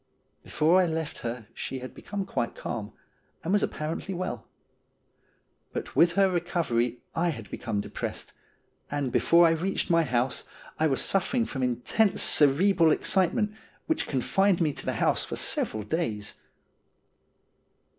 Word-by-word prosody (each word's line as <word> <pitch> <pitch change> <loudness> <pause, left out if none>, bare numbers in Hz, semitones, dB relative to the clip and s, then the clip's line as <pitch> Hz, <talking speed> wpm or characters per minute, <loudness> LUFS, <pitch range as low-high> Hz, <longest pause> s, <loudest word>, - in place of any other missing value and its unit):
Before 170 +5 +3
I 180 - +2
left 160 -2 -3
her 115 -1 -5
she 135 - -5
had 130 0 -8
become 200 -1 -5
quite 120 -8 -2
calm, 105 -3 -5 0.5
and 175 - -1
was 205 - +3
ap - - +1
parently 160 +5 -4
well. 185 +1 -4 1.3
But - - -5
with 170 0 +5
her 195 +2 +4
recovery 160 -10 -1
I 170 +1 +1
had 115 -9 -6
become 110 -4 -2
depressed, - - -5 0.6
and 140 -3 -2
before 170 +6 +5
I 165 - +5
reached 180 +2 -1
my 165 0 +5
house 125 -4 0 0.4
I 160 - +4
was 135 -3 0
suffering 230 +5 +1
from 135 -11 -4
intense 125 - +1
cerebral 165 +4 +4
excitement, 200 +6 +2 0.3
which 320 - -1
confined 190 +8 +2
me 155 -4 +1
to - - -8
the - - +1
house - - +1
for - - -4
several 110 -1 0
days. 105 - -2
160 Hz, 145 wpm, -27 LUFS, 125-185 Hz, 1.3 s, with